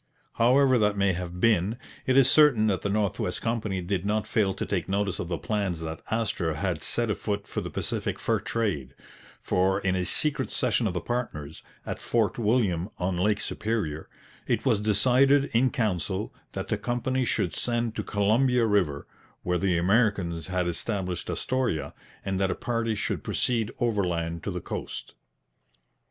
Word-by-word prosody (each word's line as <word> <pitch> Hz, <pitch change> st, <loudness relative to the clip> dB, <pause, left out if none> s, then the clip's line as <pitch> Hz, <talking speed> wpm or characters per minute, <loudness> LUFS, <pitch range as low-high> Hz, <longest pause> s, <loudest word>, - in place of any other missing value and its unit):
However 130 Hz, +2 st, +4 dB
that 105 Hz, -1 st, +2 dB
may 100 Hz, -1 st, +3 dB
have 90 Hz, 0 st, -5 dB
been, 105 Hz, 0 st, +2 dB, 0.3 s
it 130 Hz, 0 st, +3 dB
is 135 Hz, -2 st, +7 dB
certain 145 Hz, -8 st, +5 dB
that 100 Hz, -4 st, +1 dB
the 100 Hz, -, -1 dB
North 100 Hz, -1 st, 0 dB
West 90 Hz, -, -2 dB
Company 110 Hz, -5 st, -1 dB
did 90 Hz, 0 st, -1 dB
not 105 Hz, +1 st, 0 dB
fail 100 Hz, -3 st, +1 dB
to -, -, -3 dB
take -, -, -2 dB
notice 100 Hz, -1 st, 0 dB
of 85 Hz, -, -3 dB
the 85 Hz, -1 st, -2 dB
plans 90 Hz, +3 st, -2 dB
that 80 Hz, -1 st, -5 dB
Astor 100 Hz, -8 st, -1 dB
had 85 Hz, 0 st, -2 dB
set 115 Hz, +3 st, 0 dB
afoot 100 Hz, -1 st, -3 dB
for -, -, -3 dB
the -, -, -5 dB
Pacific -, -, -3 dB
fur -, -, 0 dB
trade; 90 Hz, -, -2 dB, 0.4 s
for 95 Hz, +1 st, +1 dB
in 95 Hz, -2 st, 0 dB
a 90 Hz, -, 0 dB
secret 145 Hz, +6 st, +1 dB
session 120 Hz, -2 st, +1 dB
of 95 Hz, -, -3 dB
the 90 Hz, -, -1 dB
partners, 80 Hz, -, -4 dB, 0.2 s
at -, -, -5 dB
Fort 115 Hz, -1 st, 0 dB
William 105 Hz, -6 st, +1 dB
on 90 Hz, 0 st, -1 dB
Lake 105 Hz, +4 st, +1 dB
Superior, 100 Hz, -8 st, -3 dB, 0.4 s
'_it -, -, +1 dB
was 100 Hz, -, +3 dB
decided 130 Hz, +7 st, +3 dB
in 125 Hz, +3 st, +4 dB
council 95 Hz, -4 st, -2 dB, 0.2 s
that -, -, -5 dB
the -, -, 0 dB
Company 130 Hz, +2 st, -1 dB
should 90 Hz, -8 st, 0 dB
send 120 Hz, +4 st, -1 dB
to -, -, -1 dB
Columbia 115 Hz, +4 st, +2 dB
River, 90 Hz, -10 st, +1 dB, 0.4 s
where 90 Hz, 0 st, 0 dB
the 90 Hz, -1 st, +1 dB
Americans 95 Hz, -3 st, +1 dB
had 90 Hz, -1 st, 0 dB
established 90 Hz, 0 st, -2 dB
Astoria, 130 Hz, -11 st, -1 dB, 0.3 s
and 95 Hz, -1 st, -1 dB
that 95 Hz, -1 st, +2 dB
a -, -, -1 dB
party 115 Hz, -2 st, -1 dB
should -, -, -2 dB
proceed 115 Hz, -3 st, 0 dB
overland 90 Hz, -8 st, -1 dB
to -, -, -1 dB
the -, -, -4 dB
coast_.' -, -, -6 dB
105 Hz, 170 wpm, -27 LUFS, 90-115 Hz, 0.4 s, is